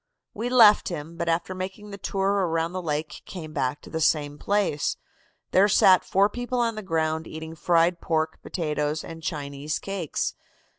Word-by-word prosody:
"We 230 +4 -3
left 225 -4 +6
him, 165 -1 -6
but 170 0 -2
after 165 +3 0
making 190 +3 -6
the 200 - -7
tour 195 0 0 0.2
around 165 0 0
the 185 0 -4
lake 155 -2 -3
came 160 -4 -8
back 135 -1 -1
to - - -11
the 160 - -2
same 145 -2 +1
place. 200 -8 0 0.5
There 195 +2 +5
sat 185 -2 +6
four 195 +2 +3
people 245 +3 -4
on 235 -1 +1
the 215 - -6
ground 160 -3 -1
eating 160 0 -7
fried 170 +1 +2
pork, 160 -1 -1
potatoes 150 -2 -2
and 165 0 -9
Chinese 145 -2 -3
cakes. 195 -6 -3
165 Hz, 170 wpm, -25 LUFS, 155-195 Hz, 0.5 s, left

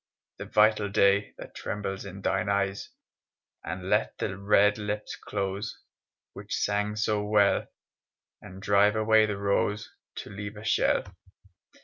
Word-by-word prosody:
The - - -5
vital 105 -1 +3
day 100 0 +2
That - - -10
trembles 100 -1 -5
in 100 0 -9
thine 95 +2 0
eyes, 100 -1 -1 0.7
And - - -5
let - - +1
the 95 - -3
red 105 +1 +3
lips 105 0 -4
close 100 +1 -4 0.6
Which - - -5
sang 105 +1 0
so 105 -1 0
well, 105 -1 +2 0.7
And 95 +1 -11
drive 100 +1 +4
away 110 0 +4
the 105 -2 -3
rose 100 +1 -1 0.2
To - - -8
leave 100 +1 -7
a 105 - -9
shell. 110 - +2
105 Hz, 135 wpm, -27 LUFS, 100-105 Hz, 0.7 s, drive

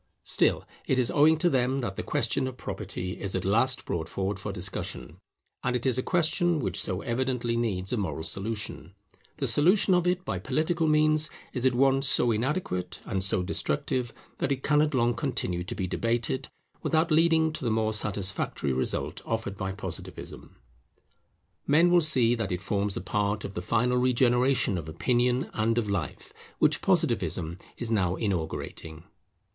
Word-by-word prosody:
Still - - +1 0.2
it 130 - +2
is 125 -2 +2
owing 155 +2 +5
to 165 - +2
them 130 -2 +1
that 95 -6 -4
the - - -3
question 130 - 0
of 130 -1 -7
property 90 -6 -5
is 95 -1 -3
at 95 - -2
last 115 +6 +2
brought 80 -1 -3
forward 100 +1 -2
for 105 0 -4
discussion: 95 -1 -5 0.5
and 125 0 0
it 125 - -2
is 130 -1 +2
a - - +2
question 175 +1 +1
which 145 - 0
so 95 -1 -1
evidently 120 -1 -1
needs 100 -5 -1
a - - +1
moral 80 -7 -3
solution, 100 0 -3 0.4
the - - -1
solution 185 +5 +4
of 180 -1 +2
it 180 +1 0
by 95 - -2
political 155 - 0
means 155 0 +3 0.2
is 125 0 +1
at 125 - +1
once 135 +1 +3
so 120 - +3
inadequate 115 - -2
and 95 -3 -1
so 95 -1 +2
destructive, 120 - -1 0.3
that 135 - 0
it 135 -1 -1
cannot 150 0 +2
long 120 -1 +2
continue 115 -8 -2
to 105 +7 -5
be 95 - -2
debated, 115 +6 -1 0.3
without 160 +1 +1
leading 160 0 +4
to 155 - -4
the 120 - 0
more 110 0 +1
satisfactory 100 -9 0
result 65 - -1
offered 110 -3 -3
by 95 -1 -3
Positivism. 100 +1 -8 1.1
Men 165 +5 +5
will 175 -1 +6
see 125 -7 +4
that 110 -5 -2
it 90 - -1
forms 100 0 -1
a - - -3
part 100 +2 -1
of 100 - -6
the 90 - -4
final 120 +6 +1
regeneration 125 -4 +2
of 80 -1 -8
opinion 125 - +1
and 115 +1 0
of 105 -4 0
life, 90 -7 -4 0.2
which - - +3
Positivism 85 0 0 0.2
is 120 -2 -2
now 95 -5 +1
inaugurating. 80 -4 -4
120 Hz, 175 wpm, -27 LUFS, 95-135 Hz, 1.1 s, will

